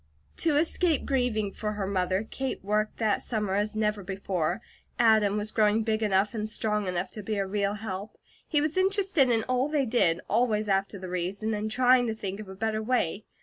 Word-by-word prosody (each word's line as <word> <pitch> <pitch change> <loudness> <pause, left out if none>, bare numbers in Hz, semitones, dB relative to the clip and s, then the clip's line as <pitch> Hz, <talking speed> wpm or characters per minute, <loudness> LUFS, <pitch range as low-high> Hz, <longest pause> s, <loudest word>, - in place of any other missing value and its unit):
To 310 -3 +2
escape 325 0 +2
grieving 245 -7 0
for 210 +1 -4
her 205 -2 -3
mother, 185 0 0
Kate 265 -3 -4
worked 210 +1 0
that 215 -3 +1
summer 210 -4 -2
as 210 +2 0
never 210 -1 0
before. 190 -2 -2 0.4
Adam 220 -3 +4
was 210 +1 -2
growing 215 0 +3
big 220 0 0
enough 205 0 +2
and 215 -1 -3
strong 210 -2 -1
enough 180 +1 -2
to 215 - -7
be 215 +1 -3
a 195 - 0
real 200 +1 -1
help. 200 -1 -6 0.3
He 295 -3 +2
was 305 +3 -1
interested 380 -7 +2
in 225 -2 +3
all 255 +3 0
they 295 -3 +1
did, 200 -8 +3
always 215 -1 +1
after 195 +1 0
the 185 -1 -7
reason, 190 +5 -2
and 210 +1 -2
trying 250 +1 +4
to 220 - -2
think 195 -2 -5
of 210 -3 -8
a 190 - -8
better 215 +2 -1
way. 220 -4 -1
215 Hz, 200 wpm, -28 LUFS, 200-240 Hz, 0.4 s, Adam